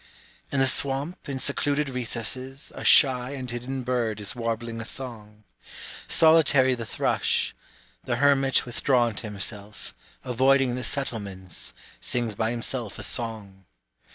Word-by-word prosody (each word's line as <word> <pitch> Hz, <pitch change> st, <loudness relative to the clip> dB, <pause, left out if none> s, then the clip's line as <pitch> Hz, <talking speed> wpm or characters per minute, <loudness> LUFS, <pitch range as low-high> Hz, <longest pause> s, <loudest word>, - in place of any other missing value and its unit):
In 140 Hz, -, -1 dB
the 135 Hz, -, +4 dB
swamp 140 Hz, +5 st, -1 dB
in 135 Hz, -, -3 dB
secluded 140 Hz, +2 st, +1 dB
recesses, 130 Hz, +2 st, -4 dB
A -, -, -8 dB
shy 130 Hz, -1 st, +5 dB
and 130 Hz, -2 st, -6 dB
hidden 125 Hz, +2 st, -5 dB
bird 120 Hz, -4 st, -1 dB
is 105 Hz, +2 st, -3 dB
warbling 115 Hz, -1 st, -3 dB
a -, -, -4 dB
song. 110 Hz, -4 st, -7 dB, 0.6 s
Solitary 145 Hz, -5 st, +5 dB
the 115 Hz, -3 st, -5 dB
thrush, -, -, 0 dB, 0.5 s
The 120 Hz, -, 0 dB
hermit 135 Hz, 0 st, +3 dB
withdrawn 120 Hz, -1 st, +1 dB
to 110 Hz, -, -6 dB
himself, 105 Hz, 0 st, -5 dB, 0.3 s
avoiding 130 Hz, +1 st, +2 dB
the 125 Hz, 0 st, -4 dB
settlements, 100 Hz, -, -3 dB, 0.2 s
Sings 120 Hz, -3 st, -2 dB
by 110 Hz, +2 st, -1 dB
himself 120 Hz, -2 st, -3 dB
a -, -, -6 dB
song. 105 Hz, -5 st, -2 dB
125 Hz, 130 wpm, -25 LUFS, 110-135 Hz, 0.6 s, shy